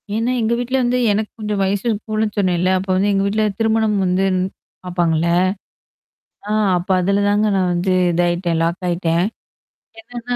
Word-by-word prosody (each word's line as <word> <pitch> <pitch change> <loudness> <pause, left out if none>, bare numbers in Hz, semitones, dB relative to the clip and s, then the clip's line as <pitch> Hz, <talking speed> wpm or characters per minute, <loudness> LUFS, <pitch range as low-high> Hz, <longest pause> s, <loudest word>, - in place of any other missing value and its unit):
ஏன்னா, 230 +3 0
எங்க 225 +1 +1
வீட்ல 250 +2 -1
வந்து 245 +1 +1
எனக்கு 210 +1 -1
கொஞ்சம் 210 -1 -2
வயசு 195 +4 -1 0.2
கூடன்னு 215 0 -1
சொன்னேன்ல. 185 -2 +1
அப்போ 190 +1 -7
வந்து 195 +2 +1
எங்க 195 0 +1
வீட்ல 215 +2 0 0.2
திருமணம் 220 -1 +1
வந்து 185 +1 +1
ன் - - 0 0.4
பாப்பாங்கள்ல. 170 -2 0 1.2
ஆ - - +1 0.2
அப்ப 175 0 -4
அதுலதாங்க 205 +3 +1
நான் 185 -1 +1
வந்து 175 +2 0 0.2
இதாயிட்டேன். 175 0 0
லாக் 170 +1 -1
ஆயிட்டேன். 170 -1 0 0.8
என்னன்னா, 245 +1 -6
195 Hz, 150 wpm, -19 LUFS, 175-220 Hz, 1.2 s, எங்க